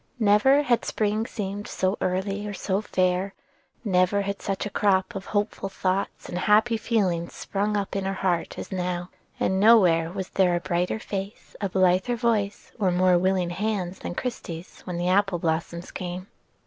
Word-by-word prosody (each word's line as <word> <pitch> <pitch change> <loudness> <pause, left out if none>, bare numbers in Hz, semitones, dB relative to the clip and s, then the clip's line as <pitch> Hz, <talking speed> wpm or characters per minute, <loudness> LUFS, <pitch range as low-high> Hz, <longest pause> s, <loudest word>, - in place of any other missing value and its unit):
Never 235 +6 +4
had 240 -4 +2
spring 215 +1 -1
seemed 205 -1 -5
so 190 +1 0
early 195 +3 -1
or 205 - -5
so 190 +1 -1
fair, 185 -1 0 0.5
never 190 -1 +2
had 200 0 -4
such 195 0 -2
a 205 - -4
crop 195 +1 +2
of 195 -1 -6
hopeful 205 -1 -1
thoughts 190 +1 -2
and 180 - -4
happy 215 +4 +4
feelings 190 -7 0
sprung 205 +1 -1
up 200 -1 -3
in 195 -1 -1
her 195 0 -1
heart 180 -3 -1
as - - -7
now; 180 -1 -3 0.3
and 190 0 +1
nowhere 180 -7 +5
was 190 0 -5
there 180 -2 +2
a - - +1
brighter 180 +2 -1
face, 200 -1 -6
a 200 - 0
blither 185 +5 +2
voice, 220 -4 -1
or 195 -3 +3
more 180 0 +4
willing 185 -1 +1
hands 190 -1 -2
than 175 - -5
Christie's 180 -9 -6
when 180 -1 -4
the 175 +1 -1
apple 195 0 +3
blossoms 170 +1 -2
came. 180 0 -5
190 Hz, 175 wpm, -25 LUFS, 180-205 Hz, 0.5 s, nowhere